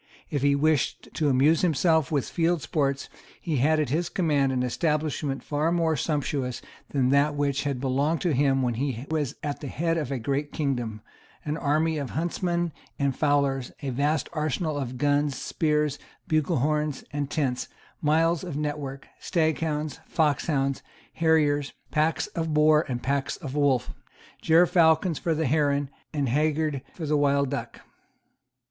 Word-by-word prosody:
If 145 - -1
he 140 0 +3
wished 150 -1 +1
to 150 -3 +1
amuse 140 +5 +4
himself 160 -2 +2
with 145 -4 0
field 170 -2 0
sports, 140 -3 -1 0.3
he 160 -4 -2
had 155 +5 +3
at 150 - 0
his 165 +5 0
command 145 -8 +1
an 125 -1 0
establishment 150 0 -1
far 150 +2 0
more 165 -2 +2
sumptuous 140 -3 -1 0.3
than 130 -3 +1
that 140 +2 +3
which 140 -1 0
had 140 -3 -1
belonged 140 +5 +1
to 175 -4 +1
him 135 0 +2
when 120 -1 +1
he 130 0 -3
was 150 -5 -1
at 145 -2 -3
the 145 - -6
head 165 +4 0
of 145 -4 -4
a 135 - -1
great 140 +5 -2
kingdom, 120 -7 -2 0.4
an 150 0 -1
army 155 +1 +1
of 140 -3 -4
huntsmen 170 +1 -1 0.2
and 140 -2 0
fowlers, 140 -3 +1
a 135 - -2
vast 145 +3 0
arsenal 155 0 -1
of 130 -3 -4
guns, 145 +1 +1
spears, 150 -2 0 0.3
buglehorns 150 -2 0
and 145 -1 -2
tents, 135 -5 -1 0.3
miles 165 +3 +2
of 170 -6 -5
network, 145 -2 -4
staghounds, 155 -3 -1
foxhounds, 145 -3 +1 0.3
harriers, 150 -3 +2 0.2
packs 155 +1 +1
for 170 - -2
the 165 - -2
boar 155 0 +4
and 120 -1 -3
packs 140 0 -1
for 155 - -7
the 145 +3 -2
wolf, 135 -5 +2 0.5
gerfalcons 165 0 +4
for 165 -2 0
the 160 +1 0
heron 145 -1 +1 0.2
and 145 -3 -1
haggards 150 +1 +1
for 165 - -5
the 150 0 +1
wild 140 -1 +2
duck. 140 - -5
145 Hz, 160 wpm, -26 LUFS, 140-155 Hz, 0.5 s, amuse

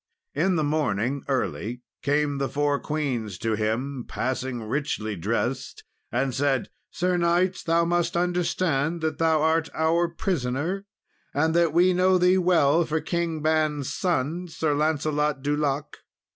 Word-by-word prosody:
In 180 +5 +1
the 155 - +1
morning 140 -3 0
early 125 -2 -2 0.2
came 145 0 +1
the 135 - -1
four 145 0 +1
queens 125 - -2
to 115 0 -1
him, 120 +5 -2
passing 130 -1 -3
richly 110 -3 -2
dressed; 115 +8 -2 0.3
and 130 +2 0
said, 135 -1 0 0.2
"Sir 180 +1 0
knight, 175 +2 +2
thou 170 +1 +3
must 175 0 0
understand 175 -3 0
that 160 0 -2
thou 160 -2 +3
art 160 0 +2
our 165 +2 +2
prisoner, 170 +3 -2 0.5
and 160 +3 +2
that 170 -1 +3
we 180 +3 +4
know 185 +1 +4
thee 180 +1 +4
well 170 -3 +4
for 160 0 -1
King 165 -2 -2
Ban's 155 -3 +1
son, 175 0 -1
Sir 160 -2 -1
Lancelot 150 -1 0
du 145 +1 +1
Lake. 145 -1 -2
150 Hz, 145 wpm, -25 LUFS, 135-170 Hz, 0.5 s, we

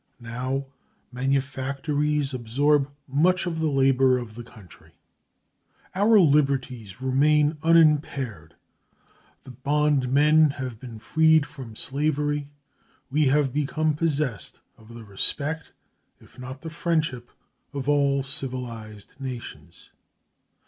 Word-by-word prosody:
Now 125 +3 -3 0.5
manufactories 140 +2 -1
absorb 135 +4 +1 0.2
much 170 +8 +2
of 165 -2 -3
the 160 - +1
labor 135 -2 +3
of 120 -3 -7
the 120 +2 -8
country. 110 -7 -16 1.0
Our 210 +3 +5
liberties 135 - +1
remain 150 +3 +2
unimpaired; 150 - +2 0.9
the 130 - -11
bondmen 145 +3 +3
have 130 -5 -6
been 120 -3 -9
freed 160 +6 +3
from 125 -7 -10
slavery; 145 +2 -1 0.6
we 150 +1 +2
have 135 -1 +2
become 155 +2 0
possessed 150 -7 -2 0.2
of 110 +1 -17
the 115 -1 -10
respect, 145 +10 -2 0.5
if - - -19
not 130 +1 -8
the 160 - -7
friendship, 155 -7 -1 0.4
of 140 -3 -5
all 140 -2 +2
civilized 120 -6 -6
nations. 130 -3 -9
140 Hz, 105 wpm, -25 LUFS, 125-150 Hz, 1.0 s, Our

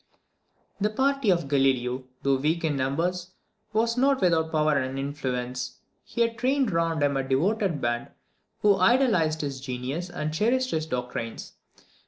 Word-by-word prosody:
The 210 +1 +2
party 270 +1 +1
of 170 -6 +2
Galileo, 130 -2 +1 0.2
though 135 -1 +3
weak 155 +5 0
in 155 -3 +1
numbers, 175 +7 -1 0.4
was 230 +2 +1
not 275 +1 +3
without 165 -3 +2
power 155 -1 +2
and 130 -1 -1
influence. 130 -3 -3 0.3
He 235 - -4
had 230 -1 +1
trained 260 -2 +2
around 165 -2 +1
him 140 -1 +2
a 135 - 0
devoted 165 +5 0
band, 120 0 -1 0.6
who 205 -2 +5
idolised 185 -7 +3
his 140 -3 -4
genius 135 +6 -4
and 155 -2 -3
cherished 255 +9 +1
his 160 0 -1
doctrines. 125 -3 -4
160 Hz, 150 wpm, -26 LUFS, 135-210 Hz, 0.6 s, who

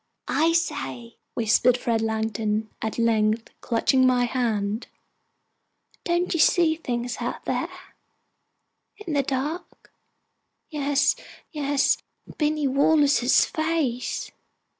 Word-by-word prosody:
"I 325 +2 +2
say," 135 - -3 0.2
whispered 235 +2 +3
Fred 230 -2 0
Langdon, 220 -1 -1
at 220 - -3
length, 225 -1 +1
clutching 255 +2 +2
my 250 -1 +3
hand, 225 -4 -1 1.2
"don't 345 +1 0
you 335 - -1
see 320 +1 +4
things 245 -6 -3
out - - -4
there - - -1 1.3
in 380 -7 -6
the 285 - +3
dark?" 280 +6 -4 0.8
"Yes, 285 -1 +2 0.4
yes 285 -2 +1 0.4
Binny 305 -1 +1
Wallace's 280 -1 +4
face!" 315 -6 -2
255 Hz, 95 wpm, -25 LUFS, 225-305 Hz, 1.3 s, see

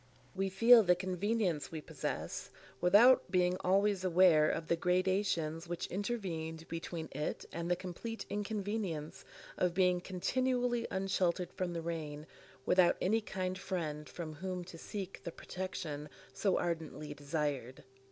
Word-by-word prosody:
We 195 0 -1
feel 230 +5 +8
the 180 -3 +4
convenience 185 -2 -1
we 160 - -4
possess, - - -4 0.3
without 210 +6 +6
being 180 0 +2
always 195 +1 +2
aware 175 -4 +5
of 165 - -2
the 170 - +3
gradations 180 -2 0
which 175 0 -3
intervened 170 -6 -3
between 165 -1 -5
it 150 - -3
and 170 +1 -4
the 180 - +3
complete 185 +6 -6
inconvenience 205 -6 -3 0.4
of 180 -1 +1
being 180 -1 +3
continually 245 +5 0
unsheltered 185 -2 0
from 180 -2 -2
the 165 -1 -4
rain, 155 -3 -4 0.4
without 180 -1 +5
any 220 +5 +2
kind 185 -3 -3
friend 155 -6 -3
from 160 -3 -6
whom 180 +3 -4
to 175 -1 -10
seek 195 0 -6
the 170 - -4
protection 160 -6 -5 0.2
so 195 -3 +1
ardently 160 -3 -3
desired. 145 -4 -3
180 Hz, 135 wpm, -34 LUFS, 165-195 Hz, 0.4 s, feel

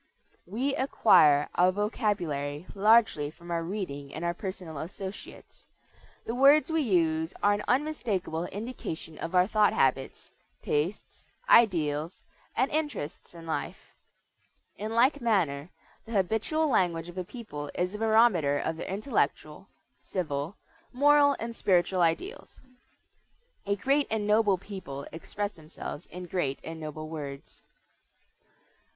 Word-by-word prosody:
We 250 +9 -1
acquire 150 - +5
our 180 +1 +4
vocabulary 180 - -2
largely 210 -7 +4
from 170 +3 -12
our 170 -1 0
reading 165 -7 -5
and 160 +3 -4
our 170 - 0
personal 180 -5 -6
associates. 190 +5 -9 0.6
The 230 - -3
words 280 +5 +5
we 320 0 +2
use 165 - +1
are 205 - +5
an 205 +1 -2
unmistakable 225 - -1
indication 205 -7 -6
of 165 +3 -4
our 180 0 +6
thought 210 0 +3
habits, 135 0 0 0.3
tastes, 160 +8 -2 0.2
ideals, 165 - +3 0.3
and 260 +3 +2
interests 295 - -3
in 165 -1 -10
life. 160 - -5 0.8
In 220 +2 -5
like 260 +4 +4
manner, 175 -10 +1 0.4
the 230 - -7
habitual 225 - +1
language 175 - +1
of 175 +1 -7
a - - -2
people 175 - -8
is 180 +2 -1
a 210 - -6
barometer 220 -10 +4
of 160 +2 -2
their - - -6
intellectual, 205 +8 -2 0.3
civil, 155 -1 -3 0.4
moral, 285 +2 +5
and 230 0 -5
spiritual 185 -2 +2
ideals. 175 - -1 1.1
A 200 - +2
great 275 +8 +1
and 220 -2 -1
noble 210 -2 +3
people 180 -8 -8
express 205 +5 -4
themselves 155 -1 -9
in 180 0 -8
great 165 -6 -1
and 160 0 -7
noble 155 0 -6
words. 145 -3 -8
185 Hz, 130 wpm, -28 LUFS, 160-225 Hz, 1.1 s, our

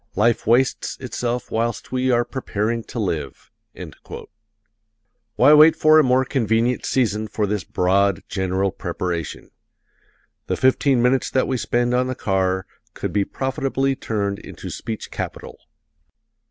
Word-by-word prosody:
Life 115 +1 +1
wastes 125 +3 +1
itself 125 -1 -3
whilst 115 0 -2
we 130 0 0
are 120 -1 +2
preparing 115 -3 -2
to - - -9
live." 80 -10 -4 1.8
Why 150 - +6
wait 155 +2 +7
for 155 0 +5
a - - +5
more 130 0 +3
convenient 120 -1 0
season 110 -4 0
for 105 0 -1
this 105 -2 -2
broad, 95 +1 +1
general 95 0 -1
preparation? 85 -4 -5 1.0
The - - -1
fifteen 130 -1 +3
minutes 125 +1 +2
that 130 - +1
we 130 - -1
spend 120 0 0
on 125 +1 +2
the 130 - -3
car 95 -2 0 0.3
could - - -4
be 100 -1 +1
profitably 135 0 -1
turned 100 -5 -3
into - - -9
speech 110 -1 -6
capital. - - -6
120 Hz, 135 wpm, -21 LUFS, 100-130 Hz, 1.8 s, wait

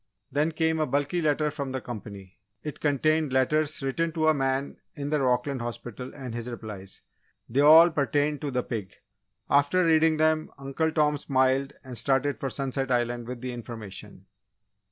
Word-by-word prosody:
Then 150 +3 +1
came 160 0 0
a 155 - +1
bulky 145 +5 0
letter 150 -1 +1
from 140 -3 -5
the 130 - -1
company. 100 -6 -9 0.2
It 150 - -6
contained 155 +1 +1
letters 145 +3 +1
written 165 +5 -1
to 160 -1 0
a - - +5
man 135 0 -1 0.2
in 145 0 -4
the 150 -2 +1
Rockland 125 +1 0
hospital 120 +1 -6
and 130 -4 -7
his 120 +1 -5
replies. 105 -5 -8 0.4
They 125 +4 -1
all 160 +4 +8
pertained 145 0 0
to 145 - -2
the 125 -2 -1
pig. 105 -6 -5 0.5
After 145 +6 +3
reading 160 -1 +4
them, 155 0 +2
Uncle 140 +4 -1
Tom 150 -2 +2
smiled 135 0 +1
and 130 -2 -8
started 135 +4 +1
for 135 - -2
Sunset 135 0 -2
Island 120 -1 0
with 125 -1 -6
the 125 -1 -4
information. 115 -5 -9
140 Hz, 170 wpm, -27 LUFS, 125-150 Hz, 0.5 s, all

